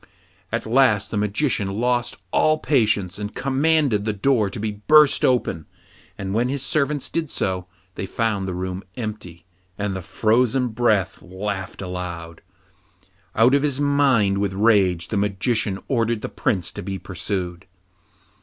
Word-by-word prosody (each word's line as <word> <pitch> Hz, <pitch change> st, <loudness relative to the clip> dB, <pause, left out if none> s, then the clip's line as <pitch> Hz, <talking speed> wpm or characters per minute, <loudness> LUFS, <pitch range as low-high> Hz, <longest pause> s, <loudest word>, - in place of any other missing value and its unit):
At -, -, -2 dB
last 110 Hz, -4 st, +3 dB
the -, -, -2 dB
Magician 105 Hz, -1 st, 0 dB
lost 120 Hz, 0 st, 0 dB
all 155 Hz, 0 st, +3 dB
patience, 105 Hz, -, +1 dB
and 105 Hz, 0 st, -5 dB
commanded 135 Hz, -3 st, +2 dB
the 110 Hz, 0 st, -1 dB
door 110 Hz, 0 st, +2 dB
to 100 Hz, -, -7 dB
be 110 Hz, 0 st, -2 dB
burst 145 Hz, +8 st, +4 dB
open. 120 Hz, -10 st, +1 dB, 0.5 s
But 95 Hz, -, -5 dB
when 120 Hz, +5 st, +1 dB
his 135 Hz, 0 st, -3 dB
servants 145 Hz, -1 st, 0 dB
did 165 Hz, -3 st, -3 dB
so, 95 Hz, -6 st, -2 dB, 0.3 s
they 95 Hz, -, -5 dB
found 105 Hz, -3 st, -1 dB
the 90 Hz, -, -3 dB
room 95 Hz, +1 st, -4 dB
empty, 105 Hz, -7 st, -6 dB, 0.3 s
and 100 Hz, -2 st, -2 dB
the 95 Hz, -, -4 dB
frozen 120 Hz, +7 st, +1 dB
breath 110 Hz, -4 st, +1 dB
laughed 95 Hz, +1 st, -5 dB
aloud. 85 Hz, -2 st, -6 dB, 0.9 s
Out 115 Hz, +4 st, +5 dB
of 140 Hz, -, +4 dB
his 140 Hz, -2 st, 0 dB
mind 135 Hz, -9 st, +3 dB
with 100 Hz, -1 st, -1 dB
rage, 95 Hz, -5 st, +2 dB
the 105 Hz, -, -1 dB
Magician 100 Hz, +1 st, 0 dB
ordered 115 Hz, -3 st, 0 dB
the -, -, -3 dB
Prince 90 Hz, -5 st, -1 dB
to -, -, -7 dB
be 95 Hz, +1 st, -4 dB
pursued. 90 Hz, -1 st, -4 dB
105 Hz, 150 wpm, -22 LUFS, 95-125 Hz, 0.9 s, Out